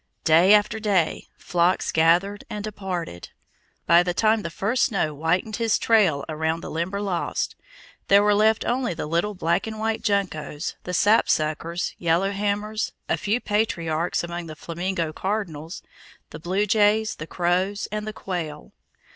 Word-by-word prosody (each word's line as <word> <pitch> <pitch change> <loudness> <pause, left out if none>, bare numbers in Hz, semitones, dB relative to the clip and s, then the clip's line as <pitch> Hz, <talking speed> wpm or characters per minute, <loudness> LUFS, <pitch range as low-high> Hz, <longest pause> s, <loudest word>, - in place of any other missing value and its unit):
Day 165 +5 +5
after 210 +1 +1
day, 200 -7 0
flocks 175 +1 +1
gathered 175 +6 +2
and 210 -1 -5
departed: 190 - -5 0.6
by 170 +1 +6
the 175 0 -2
time 220 +1 +3
the 170 - -4
first 210 +9 +1
snow 165 -8 -1
whitened 175 +8 -1
his 230 -2 +2
trail 190 -11 +3
around 160 +1 -2
the - - -7
Limberlost, 185 +3 -2 0.5
there 200 +1 +6
were 210 0 +4
left 215 +2 +3
only 245 -6 0
the 160 - -4
little 170 +7 -1
black 170 +3 0
and 220 0 -5
white 220 0 -1
juncos, 185 -8 -2
the 180 - -4
sapsuckers, 170 -4 +1
yellow 175 +3 +1
hammers, 205 +2 -2
a - - +2
few 215 +4 -1
patriarchs 175 -8 -1
among 170 0 -5
the 155 - -8
flaming 175 +4 -4 0.2
cardinals, 175 -4 -4 0.5
the - - -8
blue 185 +5 0
jays, 215 +1 +2
the 155 - -7
crows, 185 +4 0
and 210 0 -4
the 215 - -4
quail. 165 -7 -5
190 Hz, 150 wpm, -24 LUFS, 165-210 Hz, 0.6 s, by